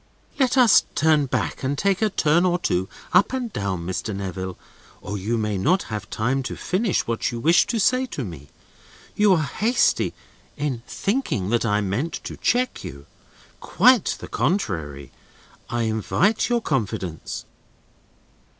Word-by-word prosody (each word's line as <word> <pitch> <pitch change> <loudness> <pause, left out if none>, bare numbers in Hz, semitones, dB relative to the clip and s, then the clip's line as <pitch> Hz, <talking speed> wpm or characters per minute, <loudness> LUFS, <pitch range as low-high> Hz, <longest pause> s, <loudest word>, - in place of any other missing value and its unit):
"Let 260 -1 +2
us 245 -5 +7
turn 155 -2 +3
back - - -2
and 140 +1 -1
take 195 +3 +1
a 215 - +3
turn 170 -2 +2
or 180 -1 +2
two 95 - -1 0.2
up 200 - +4
and 250 -4 -3
down, 95 -4 -3
Mr. 95 +3 -3
Neville, 95 -1 -5 0.4
or 100 - -6
you 105 +4 -1
may 105 -3 -1
not 180 - +2
have 105 0 -5
time 130 +5 0
to 130 - -5
finish 195 +2 0
what 115 -1 -1
you 120 - -5
wish 165 +8 +4
to 235 - -1
say 255 +5 +2
to 145 - -5
me. 80 - -9 0.7
You 210 -2 +5
are 160 -4 +2
hasty 235 - +1 0.4
in 140 -5 -2
thinking 195 - -1
that 120 -1 +1
I 105 0 +2
mean 105 - -1
to - - -7
check 250 +1 0
you. 70 +1 -9 0.5
Quite 245 +1 +3
the - - -8
contrary. 80 - -2 0.6
I 120 0 -1
invite 115 - +1
your 240 -1 +1
confidence." 105 - -3
135 Hz, 155 wpm, -23 LUFS, -, 0.7 s, us